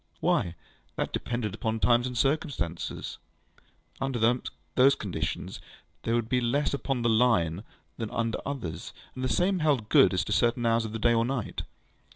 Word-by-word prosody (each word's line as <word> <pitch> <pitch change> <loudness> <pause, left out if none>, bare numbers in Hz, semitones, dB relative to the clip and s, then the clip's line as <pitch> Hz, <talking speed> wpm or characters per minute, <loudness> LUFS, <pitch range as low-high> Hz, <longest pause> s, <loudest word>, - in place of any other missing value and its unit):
Why, 85 0 +1 0.4
that - - -2
depended 120 -4 -2
upon 110 +1 -2
times 120 +2 +3
and 125 -1 -5
circumstances. 130 - -2 0.8
Under 135 -2 -1
some 120 +3 +3 0.6
conditions 80 -6 -4 0.4
there 115 - 0
would 120 -2 0
be 125 +1 +1
less 140 +6 +1
upon 135 -3 -1
the 120 - +3 0.2
Line 85 -5 +1 0.3
than 110 -2 -3
under 115 -1 -1
others, 110 - -5 0.2
and 130 - -6
the 130 - 0
same 185 +5 +2
held 140 -9 +1
good - - +6
as 95 - 0
to - - -5
certain 120 +2 +2
hours 115 0 +2
of 110 - -6
the - - -2
day 120 +2 +3
and 115 0 +2
night. 130 -4 -3
115 Hz, 170 wpm, -28 LUFS, 110-130 Hz, 0.8 s, good